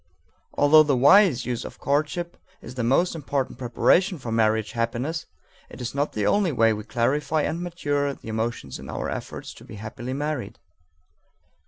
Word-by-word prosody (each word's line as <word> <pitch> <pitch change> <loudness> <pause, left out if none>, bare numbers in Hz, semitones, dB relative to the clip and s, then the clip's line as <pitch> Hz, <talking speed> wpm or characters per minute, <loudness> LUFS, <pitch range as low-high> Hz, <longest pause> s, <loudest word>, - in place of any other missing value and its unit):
Although 150 +2 +7
the 145 -4 +2
wise 145 - +5
use 120 -1 -3
of - - -9
courtship 155 +5 -1 0.2
is 120 - -10
the 125 -2 -3
most 135 +10 +2
important 140 -4 -3
preparation 170 +9 +2
for 120 -5 -6
marriage 110 -1 +1
happiness, 120 +8 -2 0.4
it - - -12
is 120 - -4
not 140 +2 -1
the 105 -2 -1
only 200 - +2
way 115 -4 +3
we 105 0 -5
clarify 145 +7 0
and 165 +3 -2
mature 145 -5 -1
the - - -15
emotions 110 - -3
in - - -10
our - - -3
efforts - - -6
to - - -15
be - - -11
happily 110 +4 -6
married. 145 -1 -3
135 Hz, 170 wpm, -24 LUFS, 115-155 Hz, 0.4 s, Although